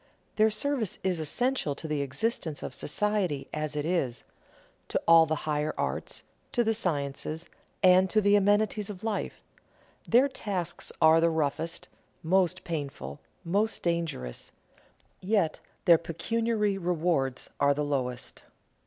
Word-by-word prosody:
Their 215 0 +5
service 240 - -1
is 185 -3 0
essential 160 - 0
to 160 - -7
the 150 -2 -1
existence 155 - -2
of - - -5
society 185 -7 -1
as 155 -1 -3
it 145 0 -1
is, 150 -9 -1 0.6
to - - 0
all 165 -1 +8
the 155 - 0
higher 150 0 -1
arts, - - -3 0.3
to 240 - +3
the 225 0 +2
sciences, 155 -4 -2 0.4
and 185 0 +6
to 215 - +3
the 205 0 +4
amenities 205 +1 +2
of 195 -1 -8
life; 220 -2 -3 0.6
their 250 +4 +5
tasks 185 -9 -3
are 160 +1 +7
the 170 - +4
roughest, 160 +1 -2 0.4
most 185 +1 +2
painful, 140 - -5 0.3
most 205 +6 0
dangerous; 165 - -2 0.7
yet 190 -5 +1 0.3
their 170 -2 +7
pecuniary 210 +4 -1
rewards 165 -7 0
are 140 0 +4
the 150 +1 -1
lowest. 125 -4 -3
170 Hz, 135 wpm, -28 LUFS, 150-205 Hz, 0.7 s, all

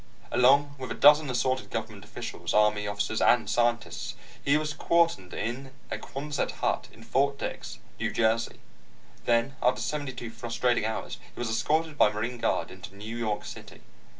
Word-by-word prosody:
Along 140 +3 +5
with 130 - -5
a - - -3
dozen 150 0 +6
assorted 130 +1 0
government 110 -3 -5
officials, 105 - -5
Army 105 -1 +3
officers, 105 +2 -1
and 120 -4 +4
scientists, 120 - 0 0.3
he 140 +1 +4
was 150 -1 -2
quartered 165 - +2
in 130 +3 -4 0.2
a - - -2
quonset 145 0 -3
hut - - -1
in 115 - -15
Fort 140 +4 +1
Dix, - - -5 0.2
New - - 0
Jersey. 115 0 +1 0.7
Then, 120 +3 +2
after 125 - +3
seventy 145 -3 -3
two 120 -2 -7
frustrating 120 0 0
hours, 110 0 -3 0.2
he - - -11
was 120 -2 -2
escorted 155 +7 0
by 105 - +6
Marine 115 +4 -3
guard - - 0
into - - -11
New 110 +3 -7
York 110 -3 -2
City. - - -10
120 Hz, 165 wpm, -28 LUFS, 110-140 Hz, 0.7 s, dozen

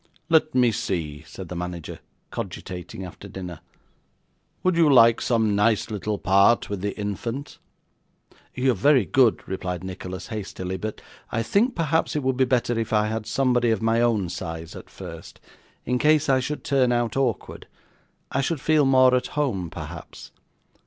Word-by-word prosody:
'Let 160 -2 +3
me 125 -2 +4
see,' 80 -8 -3
said 90 +3 -9
the 90 - -7
manager 90 -1 -5 0.3
cogitating 90 +1 -6
after 90 +3 -10
dinner. 90 -4 -7 1.0
'Would 185 -1 +2
you 165 -3 +5
like 115 -3 +6
some 110 -4 +1
nice 105 +1 +2
little 105 0 -2
part 100 +4 +3
with 100 -3 -3
the 100 0 -3
infant?' 115 +7 -4 1.0
'You 130 +1 +2
are - - +1
very 125 +2 +4
good,' 125 -1 +2
replied 90 -2 -4
Nicholas 95 0 -6
hastily; 95 -4 -5
'but 105 +3 -5 0.3
I 115 - 0
think 225 - +2
perhaps 160 -1 0
it 150 - -1
would 130 0 +1
be 130 +1 +3
better 120 -2 +1
if 115 - -3
I 105 -1 +2
had 110 -1 -3
somebody 125 -2 +2
of 110 -2 0
my 115 +1 +2
own 110 -7 +1
size 80 -2 -6
at - - -11
first, - - -10 0.5
in 125 +1 0
case 155 0 +3
I 135 -1 +4
should 145 +4 -4
turn 130 -3 +2
out 120 -2 0
awkward. 130 -6 -2 0.6
I 135 - +1
should 150 +2 -1
feel 155 +1 +3
more 130 -1 +5
at 125 0 +1
home, 100 - 0
perhaps. - - -9
115 Hz, 165 wpm, -24 LUFS, 95-130 Hz, 1.0 s, like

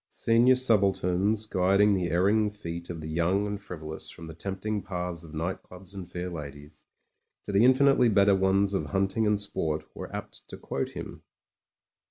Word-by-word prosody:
Senior 120 +3 +3
subalterns 100 -3 +2
guiding 100 +1 +3
the 90 -3 0
erring 100 +5 +2
feet 85 -5 -7
of 85 -2 -6
the 80 - -6
young 85 +5 +1
and 105 0 -4
frivolous 80 -2 -7
from 80 - -10
the 80 - -8
tempting 100 +5 -3
paths 90 -3 -5
of 80 -1 -11
night 85 +4 -3
clubs 90 +1 -14
and 95 -3 -8
fair 90 +1 -5
ladies, 75 -3 -9 0.6
to - - -4
the 100 +2 +4
infinitely 130 -1 +5
better 100 -1 +4
ones 95 +1 +2
of 95 - -1
hunting 95 +3 0
and 105 -1 +2
sport, 80 -6 -2
were - - -8
apt - - -7
to - - -8
quote - - -4
him. - - -8
95 Hz, 175 wpm, -27 LUFS, 85-105 Hz, 0.6 s, infinitely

